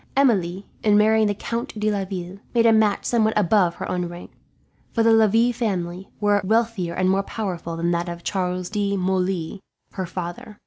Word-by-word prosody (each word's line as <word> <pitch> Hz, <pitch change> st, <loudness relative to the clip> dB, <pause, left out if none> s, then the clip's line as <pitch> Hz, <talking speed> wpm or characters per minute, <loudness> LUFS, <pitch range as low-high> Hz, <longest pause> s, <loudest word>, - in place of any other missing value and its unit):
"Emilie, 195 Hz, -8 st, +2 dB, 0.2 s
in 210 Hz, -1 st, +4 dB
marrying 220 Hz, +1 st, +4 dB
the 205 Hz, -, 0 dB
Count 230 Hz, +1 st, -4 dB
de 215 Hz, 0 st, +1 dB
Laville, 190 Hz, -2 st, -4 dB, 0.2 s
made 230 Hz, -1 st, +4 dB
a 225 Hz, -, +6 dB
match 215 Hz, -2 st, +2 dB
somewhat 220 Hz, -2 st, +2 dB
above 185 Hz, -3 st, +3 dB
her -, -, -5 dB
own 180 Hz, -1 st, -2 dB
rank; 175 Hz, +1 st, -10 dB, 0.6 s
for 230 Hz, -, +1 dB
the 225 Hz, 0 st, +5 dB
Lavilles 220 Hz, -5 st, +1 dB
were 205 Hz, -1 st, +3 dB
a -, -, -4 dB
wealthier 220 Hz, -4 st, 0 dB
and 185 Hz, 0 st, +1 dB
more 190 Hz, +1 st, +3 dB
powerful 185 Hz, -5 st, -4 dB
family 165 Hz, -, -5 dB
than 170 Hz, -, +2 dB
that 175 Hz, 0 st, -1 dB
of 170 Hz, 0 st, -7 dB
Charles 180 Hz, -1 st, -2 dB
de 200 Hz, -2 st, 0 dB
Moulins, 185 Hz, -1 st, -1 dB, 0.3 s
her 185 Hz, -2 st, -4 dB
father. 180 Hz, +4 st, -6 dB
195 Hz, 185 wpm, -23 LUFS, 180-220 Hz, 0.6 s, a